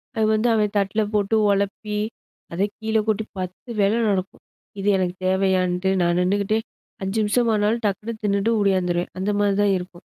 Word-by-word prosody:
அது 220 Hz, -1 st, +2 dB
வந்து 215 Hz, +2 st, +2 dB
அவன் 210 Hz, -2 st, +1 dB
தட்ல 200 Hz, +2 st, +1 dB
போட்டு 210 Hz, +1 st, +1 dB, 0.2 s
உழப்பி 200 Hz, +1 st, -1 dB, 0.6 s
அத 175 Hz, -, -2 dB, 0.2 s
கீழ 220 Hz, 0 st, 0 dB
கொட்டி 215 Hz, 0 st, 0 dB
10 185 Hz, +6 st, -7 dB
வேல 200 Hz, +1 st, +3 dB, 0.2 s
நடக்கும். 195 Hz, -1 st, -2 dB, 0.4 s
இது 195 Hz, -, -3 dB
எனக்கு 180 Hz, -1 st, -1 dB
தேவையான்ட்டு 185 Hz, -1 st, +1 dB
நான் 175 Hz, 0 st, +2 dB
நின்னுக்கிட்டே 200 Hz, +3 st, +1 dB, 0.4 s
5 195 Hz, +3 st, -1 dB
நிமிஷமானாலும் 220 Hz, 0 st, +1 dB
டக்குன்னு 210 Hz, +3 st, -2 dB
தின்னுட்டு 200 Hz, +2 st, +1 dB
ஓடியாந்துருவேன். 180 Hz, -3 st, +1 dB
அந்தமாரி 205 Hz, +1 st, +1 dB
தான் 205 Hz, -1 st, +3 dB
இருக்கும். 180 Hz, -1 st, -9 dB
200 Hz, 145 wpm, -23 LUFS, 185-215 Hz, 0.6 s, வேல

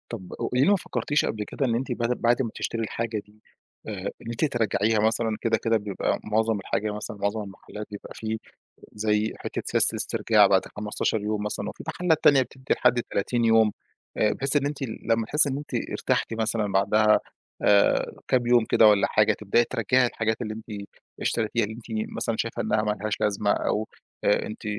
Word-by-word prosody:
طَب 95 Hz, -6 st, -7 dB
وليه 125 Hz, +2 st, +1 dB
ما 205 Hz, -, +5 dB
فكرتيش 145 Hz, -4 st, -1 dB
قبل 105 Hz, -1 st, -2 dB
كده 135 Hz, +6 st, -2 dB
إن 115 Hz, -, 0 dB
أنتِ 125 Hz, +1 st, -2 dB
بد 120 Hz, +1 st, 0 dB
بعد 120 Hz, +2 st, +3 dB
ما 115 Hz, -, -3 dB
تشتري 115 Hz, 0 st, -3 dB
الحاجة 115 Hz, 0 st, -3 dB
دي 105 Hz, +1 st, -24 dB, 0.4 s
آآ 100 Hz, -2 st, -4 dB
إن 115 Hz, -, -7 dB
أنتِ 120 Hz, +6 st, -1 dB
ترجعيها 110 Hz, -4 st, +1 dB
مثلًا، 110 Hz, 0 st, +1 dB
كده 115 Hz, -1 st, +1 dB
كده 115 Hz, 0 st, +3 dB
بيبقى 105 Hz, -2 st, -1 dB
معظم 110 Hz, 0 st, +1 dB
الحاجة 105 Hz, +1 st, -2 dB
مثلًا، 105 Hz, 0 st, -6 dB
معظم 100 Hz, +2 st, -1 dB
المحلات 105 Hz, +1 st, -9 dB
بيبقى 105 Hz, -, -9 dB
في 110 Hz, 0 st, -3 dB, 0.5 s
زي 105 Hz, 0 st, 0 dB
حتّة -, -, -5 dB
سياسة -, -, +4 dB
الاسترجاع -, -, +3 dB
بعد -, -, +3 dB
15 105 Hz, +1 st, -1 dB
يوم 105 Hz, 0 st, -2 dB
مثلًا، 105 Hz, -1 st, -3 dB
وفي -, -, -9 dB
محلات 160 Hz, -1 st, 0 dB
تانية 135 Hz, -2 st, +7 dB
بتدّي 130 Hz, +1 st, -2 dB
لحد 125 Hz, -1 st, +2 dB
30 120 Hz, +4 st, -1 dB
يوم 110 Hz, -1 st, +4 dB, 0.4 s
آآ 105 Hz, -1 st, +2 dB
بحيث 135 Hz, +2 st, 0 dB
إن 140 Hz, -, +2 dB
أنتِ 145 Hz, 0 st, -3 dB
لما 115 Hz, -2 st, -1 dB
تحسّي 150 Hz, +2 st, +4 dB
إن 135 Hz, -, -2 dB
أنتِ 145 Hz, -, -9 dB, 0.2 s
ارتحتِ 115 Hz, -, -1 dB
مثلًا 110 Hz, -2 st, -1 dB
بعدها 105 Hz, +2 st, +4 dB, 0.4 s
آآ 100 Hz, -1 st, +4 dB, 0.2 s
كام 125 Hz, -2 st, +2 dB
يوم 120 Hz, -2 st, +4 dB
كده 110 Hz, -, +5 dB
والّا 105 Hz, -1 st, +4 dB
حاجة، 110 Hz, -1 st, +3 dB
تبدئي 105 Hz, +3 st, +1 dB
ترجعي 125 Hz, +1 st, +2 dB
الحاجات 110 Hz, 0 st, -2 dB
اللي 110 Hz, -2 st, -4 dB
أنتِ 110 Hz, -2 st, -8 dB, 0.4 s
اشتريتيها، 110 Hz, 0 st, 0 dB
اللي 110 Hz, +1 st, -5 dB
أنتِ 120 Hz, -, -12 dB, 0.3 s
مثلًا 115 Hz, -, -1 dB
شايفة 115 Hz, -, -2 dB
إنها 105 Hz, -, +1 dB
ما 105 Hz, -, 0 dB
لهاش 110 Hz, 0 st, -1 dB
لازمة، 105 Hz, 0 st, +1 dB
أو 110 Hz, +1 st, -1 dB, 0.4 s
آآ 105 Hz, -, +2 dB
أنتِ 110 Hz, -, -8 dB
110 Hz, 190 wpm, -25 LUFS, 105-120 Hz, 0.5 s, تانية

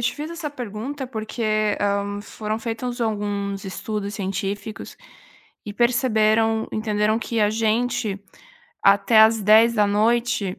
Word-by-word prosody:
te 235 Hz, -, 0 dB
fiz 300 Hz, +2 st, -6 dB
essa 335 Hz, -3 st, -5 dB
pergunta, 255 Hz, +2 st, -6 dB
porque, 215 Hz, -2 st, -1 dB
hã, 200 Hz, 0 st, -1 dB
foram 215 Hz, 0 st, -4 dB
feitos 240 Hz, +2 st, -4 dB
alguns 205 Hz, -3 st, -2 dB
estudos 200 Hz, +1 st, -5 dB
científicos 200 Hz, +2 st, -5 dB, 0.7 s
e 205 Hz, -, -5 dB
perceberam 225 Hz, -2 st, +2 dB
entenderam 215 Hz, 0 st, 0 dB
que, 230 Hz, -1 st, -3 dB
a 210 Hz, -, +3 dB
gente, 220 Hz, -2 st, -1 dB, 0.6 s
até 200 Hz, +3 st, +5 dB
às 220 Hz, 0 st, +5 dB
22h, 215 Hz, -1 st, +3 dB
215 Hz, 115 wpm, -22 LUFS, 205-230 Hz, 0.7 s, até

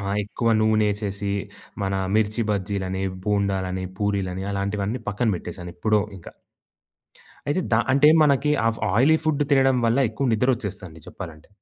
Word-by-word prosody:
ఆహ్, 100 Hz, 0 st, -2 dB
ఎక్కువ 110 Hz, +3 st, -2 dB
నూనేసేసి, 105 Hz, -2 st, 0 dB, 0.5 s
మన 95 Hz, 0 st, -1 dB, 0.2 s
మిర్చి 110 Hz, +1 st, +1 dB
బజ్జీలని, 95 Hz, -2 st, -2 dB, 0.2 s
బోండాలని, 95 Hz, -2 st, -1 dB
పూరీలని 95 Hz, -3 st, -1 dB
అలాంటివన్నీ 100 Hz, +3 st, -2 dB
పక్కన 115 Hz, +3 st, 0 dB
బెట్టేసాను 90 Hz, 0 st, -8 dB
ఎప్పుడో 105 Hz, +4 st, +2 dB, 0.2 s
ఇకా. 85 Hz, -, -12 dB, 1.2 s
అయితే 150 Hz, +6 st, +1 dB
ద -, -, +6 dB, 0.2 s
అంటే 140 Hz, +3 st, +6 dB
మనకి 145 Hz, 0 st, +3 dB, 0.2 s
ఆ -, -, +5 dB, 0.3 s
ఆయిలీ 140 Hz, +8 st, +5 dB
ఫుడ్డు 150 Hz, -2 st, +1 dB
తినడం 135 Hz, -2 st, +4 dB
వల్ల 115 Hz, +3 st, +2 dB
ఎక్కువ 135 Hz, +5 st, -2 dB
నిద్దరొచ్చేస్తదండి 105 Hz, -8 st, -2 dB
చెప్పాలంటే. 75 Hz, -2 st, -10 dB
105 Hz, 130 wpm, -23 LUFS, 95-120 Hz, 1.2 s, ద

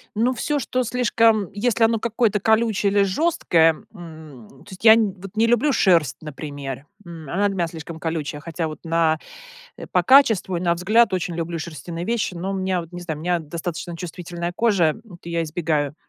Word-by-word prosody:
Ну 235 Hz, +4 st, +2 dB
всё, 290 Hz, +5 st, -1 dB
что 255 Hz, 0 st, -1 dB
слишком 230 Hz, -4 st, +2 dB
если 230 Hz, +2 st, +1 dB
оно 225 Hz, 0 st, +2 dB
какое-то 225 Hz, -2 st, 0 dB
колючее 220 Hz, -3 st, +2 dB
или 200 Hz, 0 st, +3 dB
жесткое, 185 Hz, -, +2 dB
м, 155 Hz, -, -12 dB, 0.2 s
то -, -, -14 dB
есть 190 Hz, -, -11 dB
я 220 Hz, -1 st, +9 dB
н 215 Hz, -4 st, +1 dB
вот 195 Hz, +2 st, -10 dB
не 230 Hz, +1 st, +4 dB
люблю 240 Hz, +5 st, +3 dB
шерсть, 170 Hz, -, +3 dB
например, 145 Hz, -3 st, -7 dB, 0.2 s
м, 165 Hz, -4 st, -10 dB
она 200 Hz, +4 st, +1 dB
для 195 Hz, -, -3 dB
меня 170 Hz, -2 st, 0 dB
слишком 160 Hz, 0 st, -8 dB
колючая, 155 Hz, -2 st, -4 dB
хотя 165 Hz, 0 st, -4 dB
вот 155 Hz, -, -8 dB
на 165 Hz, -1 st, +1 dB, 0.6 s
э, -, -, -8 dB
по -, -, +2 dB
качеству, 225 Hz, -9 st, +4 dB
и -, -, -6 dB
на 170 Hz, -1 st, +1 dB
взгляд 210 Hz, +4 st, +3 dB
очень 175 Hz, -1 st, -2 dB
люблю 165 Hz, 0 st, -3 dB
шерстяные 165 Hz, +2 st, -6 dB
вещи, 230 Hz, -4 st, -1 dB
но 180 Hz, +3 st, -4 dB
у 195 Hz, -, -2 dB
меня 185 Hz, -1 st, -1 dB
вот 165 Hz, +1 st, -14 dB
не 175 Hz, -, -7 dB
знаю 160 Hz, -4 st, -5 dB
у -, -, -9 dB
меня 175 Hz, 0 st, +1 dB
достаточно 170 Hz, +2 st, -6 dB
чувствительная 175 Hz, 0 st, -6 dB
кожа, 210 Hz, -6 st, +2 dB, 0.2 s
м, 205 Hz, -, -14 dB
от 170 Hz, -, -16 dB
я 170 Hz, -1 st, -2 dB
избегаю. 155 Hz, -3 st, -1 dB
175 Hz, 200 wpm, -22 LUFS, 165-215 Hz, 0.6 s, я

